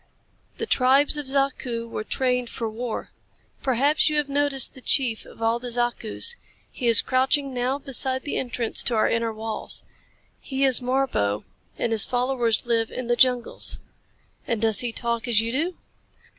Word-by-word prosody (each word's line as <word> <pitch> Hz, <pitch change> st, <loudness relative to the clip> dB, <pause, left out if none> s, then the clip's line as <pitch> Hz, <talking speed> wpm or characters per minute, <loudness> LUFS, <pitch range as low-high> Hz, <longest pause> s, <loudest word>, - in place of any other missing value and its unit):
The 455 Hz, -, -3 dB
tribes 275 Hz, -, +4 dB
of 295 Hz, -2 st, -5 dB
Zaku 265 Hz, -4 st, -1 dB
were 220 Hz, -, -5 dB
trained 250 Hz, +1 st, -1 dB
for 230 Hz, -, -4 dB
war. 225 Hz, +1 st, -5 dB, 0.5 s
Perhaps 275 Hz, +5 st, +2 dB
you 305 Hz, -, 0 dB
have 295 Hz, -1 st, 0 dB
noticed 280 Hz, -1 st, 0 dB
the 260 Hz, -, -13 dB
chief 245 Hz, -4 st, +1 dB
of 225 Hz, -, -10 dB
all 225 Hz, +1 st, +1 dB
the 245 Hz, 0 st, -6 dB
Zakus. 240 Hz, -, 0 dB, 0.4 s
He 245 Hz, -, -3 dB
is 230 Hz, -1 st, +6 dB
crouching 265 Hz, +2 st, +1 dB
now 250 Hz, +2 st, -1 dB
beside 265 Hz, -2 st, 0 dB
the 290 Hz, -, -3 dB
entrance 240 Hz, -3 st, -1 dB
to 240 Hz, -, 0 dB
our 215 Hz, -, +3 dB
inner 230 Hz, 0 st, 0 dB
walls. 220 Hz, 0 st, -3 dB, 0.5 s
He 270 Hz, -1 st, -3 dB
is 265 Hz, -3 st, +6 dB
Marbo, 250 Hz, -, 0 dB, 0.3 s
and 235 Hz, -, -1 dB
his 220 Hz, -2 st, +5 dB
followers 245 Hz, -3 st, 0 dB
live 230 Hz, -1 st, 0 dB
in 255 Hz, -, -5 dB
the 240 Hz, 0 st, +1 dB
jungles." 245 Hz, -1 st, +2 dB, 0.7 s
"And 230 Hz, -, -1 dB
does 220 Hz, -2 st, +3 dB
he 240 Hz, -1 st, 0 dB
talk 235 Hz, +1 st, -2 dB
as 230 Hz, -3 st, +4 dB
you 225 Hz, +1 st, -1 dB
do?" 325 Hz, +8 st, -2 dB
245 Hz, 170 wpm, -24 LUFS, 230-270 Hz, 0.7 s, is